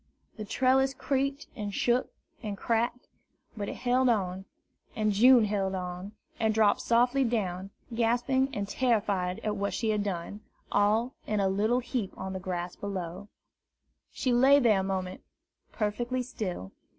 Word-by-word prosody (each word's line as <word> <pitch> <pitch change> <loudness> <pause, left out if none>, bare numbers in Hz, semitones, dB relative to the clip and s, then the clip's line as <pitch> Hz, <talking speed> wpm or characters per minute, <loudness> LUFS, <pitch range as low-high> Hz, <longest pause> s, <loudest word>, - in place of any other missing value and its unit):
The 215 - -6
trellis 265 +4 +2
creaked 275 +1 -1
and 205 -1 -4
shook 240 +5 +1 0.3
and 210 -4 -4
cracked, 235 +3 -1 0.5
but 205 -2 -4
it - - -5
held 255 +1 +2
on, 190 -4 0 0.5
and 215 -1 +1
June 240 +3 +6
held 195 -2 -1
on, 180 +2 -5 0.3
and 220 -1 +1
dropped 215 -2 +4
softly 245 +3 +3
down, 195 -6 -2 0.2
gasping 245 +3 +1
and 205 -6 -3
terrified 205 -6 0
at 210 -1 -1
what 200 0 -1
she 225 -2 0
had 210 -1 0
done, 195 +1 -4 0.3
all 215 +5 +2
in 210 -1 0
a 195 - +2
little 215 +6 +1
heap 240 -5 -4
on 190 0 -5
the 190 - -4
grass 180 -1 -4
below. 190 -1 -5 0.8
She 255 -3 0
lay 265 +4 +6
there 230 -7 +4
a - - -1
moment 185 -1 -3 0.5
perfectly 240 +4 -1
still. 180 - -5
215 Hz, 150 wpm, -29 LUFS, 195-245 Hz, 0.8 s, June